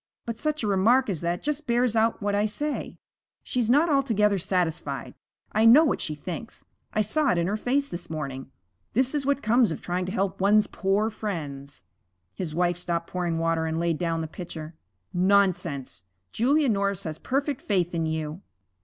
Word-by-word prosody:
But 230 -1 -5
such 305 -3 -1
a - - 0
remark 220 +5 +3
as 170 - -3
that 170 +1 -2
just 300 0 -2
bears 240 -1 +2
out 220 -1 +2
what 205 0 0
I 205 +1 +2
say 290 +8 -4 0.5
she's 240 -3 -1
not 295 +7 +5
altogether 220 - +2
satisfied. 175 -2 -2 0.4
I 220 +1 +3
know 265 +8 +8
what 290 - 0
she 155 - -2
thinks; 180 +9 -7 0.3
I 215 - +1
saw 285 +8 +1
it 205 - +2
in 170 - +1
her 200 +4 0
face 270 +6 0
this 175 - -7
morning 140 -5 -5 0.4
this 260 +4 +2
is 285 -2 -1
what 280 0 +1
comes 230 -2 +4
of - - -4
trying 180 +1 -2
to - - -3
help 195 -2 -1
one's 210 +2 +5
poor 200 +3 0
friends.' 145 -10 -6 0.5
His 165 -5 -5
wife 175 0 +1
stopped 170 -1 -3
pouring 175 -2 -1
water 165 0 0
and 160 0 -1
laid 170 -2 0
down 165 -2 -1
the 160 - -3
pitcher. 160 -1 -8 0.4
'Nonsense. 180 - +1 0.3
Julia 280 +6 +2
Norris 200 -4 +1
has 155 -1 -5
perfect 275 0 -1
faith 180 -4 0
in 165 -1 0
you.' 160 +2 -3
195 Hz, 185 wpm, -26 LUFS, 170-235 Hz, 0.5 s, know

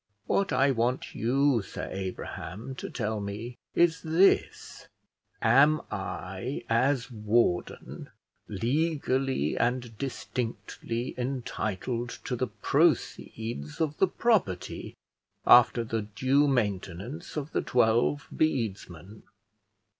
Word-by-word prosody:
What 195 - +1
I 135 +1 +3
want 125 +1 -1
you, 130 +1 +2
Sir 95 - -6
Abraham, 95 +4 -6
to 130 - -6
tell 110 -2 -2
me, 105 +5 -6 0.2
is 170 -1 +3
this: 165 +5 +2 0.6
am 140 +7 +5
I, 95 +10 -4
as 125 +2 +1
warden, 105 -4 -1 0.4
legally 135 - 0
and 120 -1 -1
distinctly 120 -2 -4
entitled 120 -2 -3
to 125 - -2
the 125 +1 -1
proceeds 105 -4 -1
of 150 -2 -1
the 190 - +5
property, 180 - 0 0.5
after 120 -1 +7
the 115 0 -2
due 130 +8 +2
maintenance 110 - -2
of 150 +1 -4
the - - 0
twelve 120 +4 +2
bedesmen?" 105 - -2
120 Hz, 100 wpm, -28 LUFS, 105-135 Hz, 0.6 s, after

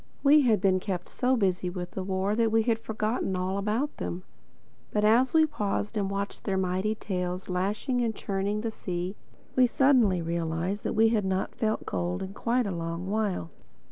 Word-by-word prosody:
We 295 +1 +7
had 230 -6 +3
been 190 -1 +3
kept 180 -2 -4
so 255 +1 +1
busy 185 -5 +1
with 175 -1 -5
the 190 - -4
war 190 +2 0
that 225 -1 +2
we 225 0 +3
had 225 -1 +1
forgotten 215 -2 -2
all 185 +2 -1
about 220 +9 -1
them. 180 +1 -4 0.7
But 210 0 +1
as 240 +5 +4
we 320 -1 +5
paused 210 -6 -2
and 200 -2 0
watched 200 0 -4
their 195 -2 0
mighty 190 +3 0
tails 180 -3 -3
lashing 205 +8 0
and 225 -2 0
churning 200 +2 -2
the 225 0 -2
sea, 180 -1 -4 0.4
we 255 -1 +6
suddenly 245 -8 +4
realized 170 +4 -2
that - - 0
we 225 +1 +5
had 220 -2 +1
not 190 0 -1
felt 215 -1 -1
cold 90 -1 -2
in 190 - -6
quite 240 +3 0
a 200 - -2
long 170 +2 -4
while. 205 - -1
200 Hz, 190 wpm, -28 LUFS, 185-225 Hz, 0.7 s, We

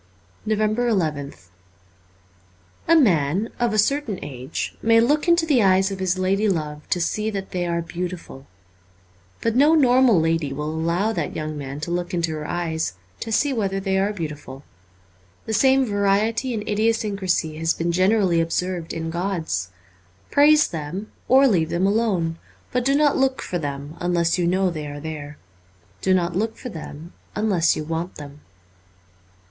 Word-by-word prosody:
350 215 +1 +1
NOVEMBER 150 -5 -1
nth 90 -9 -19 1.4
A 335 - +6
MAN 190 - +3
(of 240 -1 +1
a 215 - -1
certain 230 -1 +1
age) 130 -2 -5
may 230 0 +5
look 290 +8 +2
into 340 -1 +4
the 285 -7 +3
eyes 190 0 +3
of 195 - -5
his 185 0 0
lady 195 +3 +1
love 150 -4 -3
to 180 - +1
see 210 +5 -1
that 195 -2 -5
they 175 -1 -2
are 170 0 -1
beautiful. 170 -6 -6 0.9
But 230 0 0
no 295 +5 +5
normal 255 - +5
lady 160 -3 0
will 150 +2 -3
allow 170 +7 0
that 170 -6 -3
young 155 0 -4
man 140 0 -6
to 170 - -4
look 175 +1 -2
into 170 -1 0
her 155 -1 -5
eyes 165 - -2 0.3
to 225 - -5
see 275 +5 +2
whether 195 -5 -1
they 190 0 0
are 200 +2 +1
beautiful. 150 -7 -7 0.8
The 220 - -3
same 265 +4 +4
variety 210 +4 +1
and 210 -1 -5
idiosyncrasy 205 -7 0
has 165 0 +1
been 170 +1 -1
generally 185 -1 +3
observed 170 0 -2
in 165 0 -4
gods. 170 - -2 0.6
Praise 295 +1 +5
them; 170 +6 -6 0.2
or 270 +2 +6
leave 170 -9 +2
them 170 +3 0
alone; 195 -6 0 0.3
but 250 0 0
do 275 +1 +3
not 290 -1 +3
look 265 -1 +1
for 175 - -3
them 145 0 -5
unless 175 0 +1
you 175 - +1
know 185 +1 +2
they 155 -3 -5
are 145 0 -7
there. 150 -1 -7 0.6
Do 190 0 +3
not 175 -1 0
look 220 +4 -1
for 250 - -7
them 160 -2 -9 0.2
unless 195 -6 +2
you 155 - -3
want 165 +3 -4
them. 145 0 -10
185 Hz, 165 wpm, -23 LUFS, 160-220 Hz, 1.4 s, A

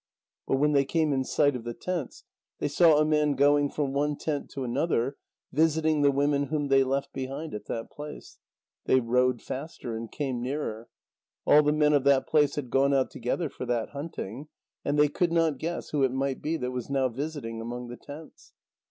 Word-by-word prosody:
But - - +2
when 150 +2 +2
they 140 -2 +4
came 155 +1 +1
in 130 -1 +1
sight 145 +1 +2
of 120 - -5
the 120 0 -5
tents, 175 -8 -4 0.3
they - - -1
saw 155 +1 +5
a 155 - +4
man 150 -1 +2
going 145 +1 +3
from 140 -2 -2
one 145 +1 +1
tent 150 -3 -3
to 135 - -5
another, 130 +1 0 0.4
visiting 155 0 +2
the 145 - +5
women 140 +1 +1
whom 145 0 -2
they 135 0 +5
left 140 +1 -2
behind 135 +4 -5
at 105 - -6
that 115 0 -5
place. 150 0 -10 0.5
They 130 - +4
rowed 125 0 +1
faster, 130 -4 -6
and 115 -1 -6
came 130 -5 -3
nearer. 125 -4 -4 0.6
All 150 - +7
the 150 0 +2
men 150 0 +3
of 145 -2 +3
that 135 -1 +4
place 150 -2 +3
had 130 -5 -4
gone 140 +1 +3
out 135 -1 +1
together 125 +7 -2
for 125 - -7
that 120 -2 -1
hunting, 140 -3 -6 0.4
and 145 - 0
they 150 0 +6
could 170 +3 0
not 165 -5 +2
guess 170 +2 -4
who 150 - 0
it 135 -2 +3
might 135 0 -2
be 160 +2 -1
that 125 -2 -3
was 125 0 -5
now 135 -1 +2
visiting 130 -3 -5
among 120 +1 -6
the 120 - -8
tents. 150 +2 -12
140 Hz, 205 wpm, -28 LUFS, 130-150 Hz, 0.6 s, All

